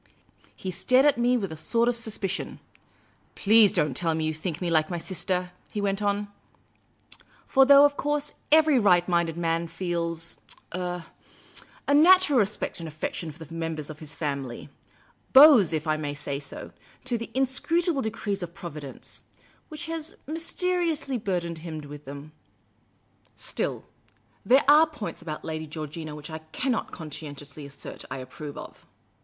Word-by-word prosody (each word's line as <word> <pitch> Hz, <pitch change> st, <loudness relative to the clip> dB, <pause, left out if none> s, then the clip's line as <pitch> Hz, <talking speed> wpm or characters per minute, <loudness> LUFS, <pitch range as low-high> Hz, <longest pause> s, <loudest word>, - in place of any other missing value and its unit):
He 190 Hz, -, -5 dB
stared 255 Hz, +9 st, +3 dB
at 290 Hz, -5 st, +4 dB
me 245 Hz, +1 st, +3 dB
with 195 Hz, -7 st, -3 dB
a -, -, -5 dB
sort 230 Hz, +9 st, +1 dB
of 245 Hz, -, +2 dB
suspicion. 220 Hz, -4 st, -3 dB, 0.4 s
" -, -, -36 dB
Please 215 Hz, -1 st, +6 dB
don't 150 Hz, -, +1 dB
tell 165 Hz, -2 st, +1 dB
me 160 Hz, -, -1 dB
that -, -, 0 dB
you -, -, -2 dB
think 155 Hz, 0 st, -4 dB
me 175 Hz, -2 st, -2 dB
like 155 Hz, -1 st, +3 dB
my 175 Hz, -, -2 dB
sister," 180 Hz, +1 st, -2 dB, 0.2 s
he 210 Hz, -, -4 dB
went 200 Hz, 0 st, -1 dB
on. 205 Hz, 0 st, 0 dB, 1.2 s
For 270 Hz, 0 st, +5 dB
though, 280 Hz, +1 st, +9 dB
of 285 Hz, 0 st, +1 dB
course, 295 Hz, 0 st, -1 dB, 0.2 s
every 310 Hz, -3 st, +6 dB
right 180 Hz, -5 st, +4 dB
minded 170 Hz, -2 st, +1 dB
man 165 Hz, 0 st, 0 dB
feels 170 Hz, -1 st, -4 dB, 0.2 s
— -, -, -21 dB
ur 180 Hz, -1 st, -3 dB, 0.4 s
— -, -, -19 dB
a 285 Hz, -, +3 dB
natural 325 Hz, -2 st, +6 dB
respect 205 Hz, -2 st, -1 dB
and 165 Hz, -, -6 dB
affection 155 Hz, +1 st, -4 dB
for 160 Hz, +2 st, -11 dB
the 165 Hz, -, -13 dB
members 165 Hz, -2 st, -4 dB
of 155 Hz, -, -11 dB
his 155 Hz, -1 st, -8 dB
family 140 Hz, -4 st, -4 dB, 0.3 s
— -, -, -34 dB
bows, 265 Hz, -, +9 dB
if 155 Hz, -1 st, -1 dB
I 155 Hz, -1 st, +1 dB
may 145 Hz, -2 st, -4 dB
so 140 Hz, -1 st, -4 dB
say, 140 Hz, -, -7 dB, 0.3 s
to 255 Hz, -1 st, -1 dB
the 230 Hz, -, -6 dB
inscrutable 275 Hz, +4 st, +1 dB
decrees 215 Hz, -3 st, -3 dB
of 175 Hz, 0 st, -6 dB
Provi 170 Hz, -6 st, -7 dB
dence 140 Hz, -3 st, -7 dB, 0.2 s
— -, -, -33 dB
which 310 Hz, +1 st, -6 dB
has 325 Hz, -1 st, -6 dB
mysteriously 330 Hz, -3 st, -1 dB
burdened 175 Hz, -5 st, -2 dB
him 160 Hz, -1 st, -6 dB
with 145 Hz, 0 st, -10 dB
them 140 Hz, +2 st, -9 dB, 0.6 s
— -, -, -39 dB
still, -, -, -3 dB, 0.6 s
there 265 Hz, +3 st, +5 dB
are 305 Hz, +3 st, +7 dB
points 295 Hz, -, -7 dB
about 155 Hz, -2 st, -6 dB
Lady 160 Hz, 0 st, -4 dB
Georgina 155 Hz, 0 st, -6 dB
which 150 Hz, +2 st, -9 dB
I 160 Hz, -, -5 dB
cannot 225 Hz, +10 st, -2 dB
con.scientiously 145 Hz, -2 st, -8 dB
assert 140 Hz, 0 st, -7 dB
I 130 Hz, -, -4 dB
approve 140 Hz, +3 st, -8 dB
of." -, -, -11 dB
175 Hz, 175 wpm, -26 LUFS, 155-250 Hz, 1.2 s, though